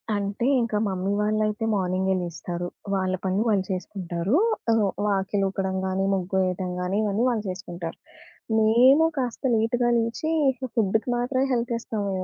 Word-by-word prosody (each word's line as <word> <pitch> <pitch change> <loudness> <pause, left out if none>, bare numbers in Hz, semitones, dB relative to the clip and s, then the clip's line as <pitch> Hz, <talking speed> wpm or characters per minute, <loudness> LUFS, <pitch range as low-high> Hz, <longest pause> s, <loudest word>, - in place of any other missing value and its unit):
అంటే 205 +3 -2 0.2
ఇంకా 230 -2 -1
మమ్మీ 190 0 -2
వాళ్ళైతే 215 +1 0
మార్నింగే 190 0 0
లేస్తారు. 175 0 -5 0.3
వాళ్ళ 185 -1 0
పని 190 +1 +1
వాళ్ళు 205 -4 +2
చేసుకుంటారు. 185 +2 -2 0.4
ఆహ్, 225 -1 +3 0.2
వాకిలి 200 0 0
ఊకడం 190 -1 -2
గాని, 190 +1 0
ముగ్గు 190 0 -2
వేయటం 185 0 -2
గాని 180 +2 -1
ఇవన్నీ 210 +2 0
వాళ్ళు 225 -3 -1
చేసుకుంటారు. 175 -2 -6 0.6
మేము 250 +8 +5
కాస్త 250 -2 -3
లేట్‌గా 240 +2 +1
లేచి, 230 +8 -1 0.5
ఫుడ్‌కి 220 +2 +1
మాత్రమే 255 +2 0
హెల్ప్ 235 0 0
ఇస్తాము. 210 -3 -3
మేము 185 - -2
200 Hz, 140 wpm, -25 LUFS, 185-225 Hz, 0.6 s, మేము